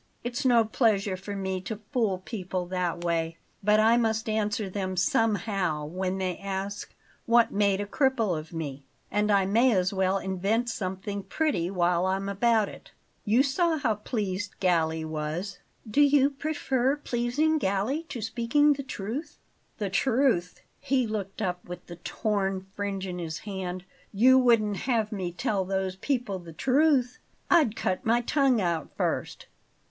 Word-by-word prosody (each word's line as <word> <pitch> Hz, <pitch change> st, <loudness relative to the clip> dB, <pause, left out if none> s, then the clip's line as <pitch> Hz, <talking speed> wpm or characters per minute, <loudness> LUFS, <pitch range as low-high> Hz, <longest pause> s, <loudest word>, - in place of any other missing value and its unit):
It's 245 Hz, +4 st, -3 dB
no 240 Hz, -3 st, +5 dB
pleasure 215 Hz, -4 st, +1 dB
to 200 Hz, +2 st, -7 dB
me 190 Hz, -1 st, -2 dB
to 210 Hz, +2 st, -5 dB
fool 210 Hz, -8 st, 0 dB
people 185 Hz, -5 st, -3 dB
that 175 Hz, -1 st, -2 dB
way, 165 Hz, -1 st, -1 dB, 0.3 s
but 210 Hz, +1 st, +4 dB
I 225 Hz, +2 st, +5 dB
must 225 Hz, -1 st, 0 dB
answer 215 Hz, 0 st, 0 dB
them 185 Hz, -1 st, -3 dB
somehow 195 Hz, -6 st, +1 dB
when 185 Hz, +4 st, -2 dB
they 185 Hz, -2 st, -2 dB
ask 195 Hz, +1 st, -5 dB, 0.3 s
what 235 Hz, 0 st, +5 dB
made 200 Hz, -1 st, +2 dB
a 205 Hz, -, -2 dB
cripple 230 Hz, -, +1 dB
of 155 Hz, 0 st, -7 dB
me; 145 Hz, -5 st, -5 dB, 0.3 s
and 210 Hz, 0 st, +1 dB
I 200 Hz, -2 st, +4 dB
may 230 Hz, +6 st, +4 dB
as 185 Hz, 0 st, +1 dB
well 190 Hz, 0 st, +1 dB
invent 195 Hz, +5 st, -1 dB
something 200 Hz, 0 st, -4 dB
pretty 235 Hz, -, -1 dB
while 180 Hz, -1 st, +1 dB
I'm 195 Hz, +1 st, -1 dB
about 220 Hz, +1 st, +2 dB
it. -, -, -12 dB, 0.4 s
You 230 Hz, +5 st, +4 dB
saw 320 Hz, +4 st, +1 dB
how 255 Hz, -7 st, +1 dB
pleased 205 Hz, -2 st, -4 dB
Galli 160 Hz, -4 st, +1 dB
was." 155 Hz, +5 st, -4 dB, 0.3 s
"Do 215 Hz, +7 st, +2 dB
you 285 Hz, -1 st, +5 dB
prefer 275 Hz, -2 st, 0 dB
pleasing 290 Hz, +4 st, 0 dB
Galli 200 Hz, +8 st, 0 dB
to 240 Hz, -, -5 dB
speaking 245 Hz, +7 st, +3 dB
the 280 Hz, -, -5 dB
truth?" 260 Hz, +2 st, -5 dB, 0.4 s
"The 205 Hz, -4 st, -3 dB
truth!" 225 Hz, -5 st, +1 dB, 0.2 s
He 260 Hz, -2 st, +1 dB
looked 215 Hz, -1 st, -4 dB
up 180 Hz, -2 st, -2 dB
with 180 Hz, 0 st, -7 dB
the 175 Hz, -, -10 dB
torn 195 Hz, 0 st, -2 dB
fringe 200 Hz, -1 st, -3 dB
in 180 Hz, -1 st, -5 dB
his 165 Hz, -1 st, -4 dB
hand. 185 Hz, 0 st, -5 dB, 0.3 s
"You 255 Hz, +6 st, +6 dB
wouldn't 220 Hz, -5 st, +3 dB
have 225 Hz, 0 st, 0 dB
me 185 Hz, -4 st, -3 dB
tell 200 Hz, 0 st, -1 dB
those 190 Hz, 0 st, -2 dB
people 235 Hz, -4 st, -2 dB
the 170 Hz, -2 st, -11 dB
truth? 255 Hz, -, +2 dB, 0.3 s
I'd 300 Hz, -11 st, +4 dB
cut 185 Hz, -4 st, -1 dB
my 235 Hz, +2 st, +3 dB
tongue 270 Hz, -1 st, +2 dB
out 170 Hz, -5 st, -1 dB
first!" -, -, -2 dB
205 Hz, 160 wpm, -27 LUFS, 185-240 Hz, 0.4 s, You